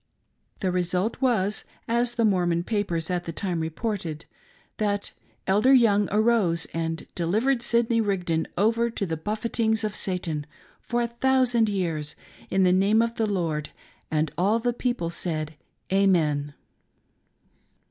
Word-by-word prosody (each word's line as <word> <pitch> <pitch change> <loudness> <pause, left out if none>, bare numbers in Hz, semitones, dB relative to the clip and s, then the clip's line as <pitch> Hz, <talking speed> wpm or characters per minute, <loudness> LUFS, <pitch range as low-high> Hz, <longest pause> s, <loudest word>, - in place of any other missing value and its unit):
The 185 - +1
result 180 +6 -1
was 215 -6 +1
— - - -32
as 240 +1 +1
the 230 - +2
Mormon 175 -4 +2
papers 180 -5 -2
at 175 -1 -1
the 165 - -4
time 175 0 -2
reported 165 -1 -3 0.3
— - - -34
that: 205 -1 -1 0.2
" - - -38
Elder 215 +8 +4
Young 210 -5 +4
arose 210 -6 +2
and 165 0 -3
delivered 220 +10 +1
Sidney 235 -1 +2
Rigdon 180 -6 -1
over 230 +4 +2
to 215 -3 -3
the 165 -3 -2
buffetings 220 +5 -1
of 210 -1 -2
Satan, 165 -5 -1 0.3
for 240 0 -1
a - - 0
thousand 240 -2 +2
years, 165 -7 -2 0.3
in 190 0 +2
the 180 -1 +4
name 205 +4 +4
of 230 0 -2
the 225 -2 0
Lord; 165 -7 -2 0.4
and 155 -1 0
all 200 +5 +3
the 240 +1 0
people 240 -9 -2
said, 155 -3 -2 0.4
Amen." 155 -7 +2
195 Hz, 145 wpm, -25 LUFS, 170-230 Hz, 0.4 s, Elder